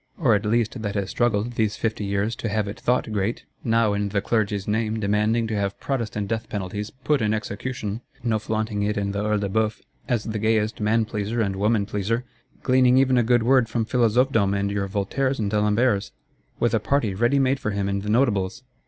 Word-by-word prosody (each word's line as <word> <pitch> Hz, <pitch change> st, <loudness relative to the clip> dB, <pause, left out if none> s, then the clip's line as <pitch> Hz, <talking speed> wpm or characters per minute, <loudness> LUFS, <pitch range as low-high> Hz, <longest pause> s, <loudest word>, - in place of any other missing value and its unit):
Or 130 Hz, -9 st, +3 dB
at 105 Hz, 0 st, +1 dB
least 115 Hz, +1 st, 0 dB
that 105 Hz, -1 st, -3 dB
has 100 Hz, -2 st, -2 dB
struggled, 120 Hz, -1 st, +1 dB
these 110 Hz, -2 st, 0 dB
fifty 110 Hz, -2 st, -2 dB
years, 100 Hz, +3 st, -1 dB
to 115 Hz, -, -3 dB
have 105 Hz, 0 st, 0 dB
it 100 Hz, -, -6 dB
thought 125 Hz, -2 st, 0 dB
great; 105 Hz, +2 st, -2 dB, 0.2 s
now, 115 Hz, -2 st, +2 dB
in 100 Hz, 0 st, -1 dB
the 100 Hz, 0 st, 0 dB
Clergy's 105 Hz, -2 st, -1 dB
name, 110 Hz, +1 st, 0 dB
demanding 105 Hz, +3 st, +1 dB
to 110 Hz, -1 st, -2 dB
have 100 Hz, -1 st, -2 dB
Protestant 110 Hz, -7 st, -2 dB
death 115 Hz, +1 st, -3 dB
penalties 105 Hz, +1 st, -4 dB
"put 135 Hz, +2 st, -1 dB
in 105 Hz, 0 st, +2 dB
execution;" 110 Hz, +1 st, -4 dB, 0.2 s
no 115 Hz, -3 st, +1 dB
flaunting 110 Hz, -1 st, -2 dB
it 105 Hz, +1 st, 0 dB
in 100 Hz, -1 st, -1 dB
the 100 Hz, +1 st, -2 dB
Œil 105 Hz, 0 st, +1 dB
de 100 Hz, -, 0 dB
Bœuf, 110 Hz, +2 st, 0 dB, 0.3 s
as 120 Hz, -4 st, +1 dB
the 110 Hz, -1 st, -3 dB
gayest 110 Hz, 0 st, +1 dB
man 110 Hz, +2 st, +2 dB
pleaser 105 Hz, +1 st, -3 dB
and 100 Hz, -3 st, 0 dB
woman 105 Hz, +1 st, +1 dB
pleaser; 110 Hz, +3 st, -1 dB, 0.4 s
gleaning 130 Hz, -1 st, +4 dB
even 130 Hz, -1 st, +4 dB
a 125 Hz, -, +4 dB
good 120 Hz, 0 st, +3 dB
word 125 Hz, -1 st, +4 dB
from 115 Hz, -1 st, -1 dB
Philosophedom 115 Hz, -3 st, +2 dB
and 100 Hz, 0 st, -1 dB
your 100 Hz, -1 st, -1 dB
Voltaires 120 Hz, +7 st, -1 dB
and 105 Hz, -3 st, -1 dB
D'Alemberts? 105 Hz, 0 st, +2 dB, 0.5 s
With 120 Hz, -1 st, +1 dB
a 115 Hz, -, +3 dB
party 110 Hz, -1 st, 0 dB
ready 120 Hz, +8 st, +2 dB
made 135 Hz, 0 st, +2 dB
for -, -, -2 dB
him 100 Hz, -1 st, -1 dB
in 100 Hz, 0 st, -1 dB
the 105 Hz, +1 st, -5 dB
Notables? 105 Hz, -2 st, +1 dB
110 Hz, 210 wpm, -24 LUFS, 100-120 Hz, 0.5 s, gleaning